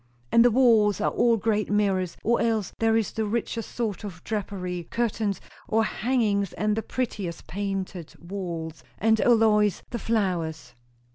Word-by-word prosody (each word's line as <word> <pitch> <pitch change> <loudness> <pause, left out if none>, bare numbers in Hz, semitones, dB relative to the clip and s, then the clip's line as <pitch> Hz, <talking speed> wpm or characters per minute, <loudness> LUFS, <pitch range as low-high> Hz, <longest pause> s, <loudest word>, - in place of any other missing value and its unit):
"And 230 - +6
the 245 - +6
walls 220 -5 +4
are - - +1
all 235 -1 +3
great 215 -1 0
mirrors, 195 -4 +1
or 235 +2 +2
else 220 -4 0
there 225 0 +3
is 225 - 0
the 220 - -2
richest 230 +1 -3
sort 220 -6 -2
of 180 -4 -8
drapery 180 -5 -4
curtains, 220 -4 -1 0.3
or 220 +1 +2
hangings; 215 -5 0
and 210 0 0
the 225 - -1
prettiest 205 -9 -4
painted 195 -3 -4
walls. 170 -5 -6
And 220 +1 +3
O, 245 - +5
Lois, 210 -3 +3
the 235 - -3
flowers! 170 - -1
210 Hz, 155 wpm, -26 LUFS, 185-225 Hz, 0.3 s, And